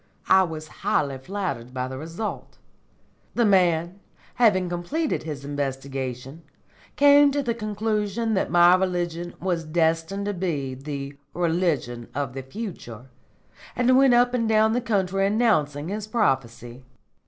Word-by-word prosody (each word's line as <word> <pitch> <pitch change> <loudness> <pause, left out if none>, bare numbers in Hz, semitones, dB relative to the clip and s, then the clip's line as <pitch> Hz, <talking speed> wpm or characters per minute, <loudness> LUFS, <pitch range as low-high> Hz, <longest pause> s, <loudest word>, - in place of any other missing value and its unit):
I 190 - +7
was 160 -4 -4
highly 145 -9 0
flattered 135 -7 -5
by 125 0 -2
the 130 0 -7
result. 165 +8 -6 0.8
The 235 - +3
man, 180 -2 +2 0.3
having 205 -7 +3
completed 175 - -2
his 145 -3 -6
investigation, 135 0 -4 0.5
came 285 0 +6
to 285 0 -1
the 235 -3 0
conclusion 215 0 -2
that 190 - 0
my 175 0 +6
religion 175 -2 -1
was 175 -2 -1
destined 165 +4 0
to 205 - -1
be 155 -8 -2
the 140 +1 -6 0.2
religion 160 -9 -1
of 140 -2 -2
the 135 - -5
future, 135 - -8 0.7
and 250 +1 +3
went 265 -2 +5
up 245 +1 +3
and 230 -3 0
down 220 0 +4
the 245 - 0
country 195 -4 0
announcing 170 -9 +1
his 210 +1 -4
prophecy. 130 - -1
175 Hz, 135 wpm, -24 LUFS, 140-215 Hz, 0.8 s, I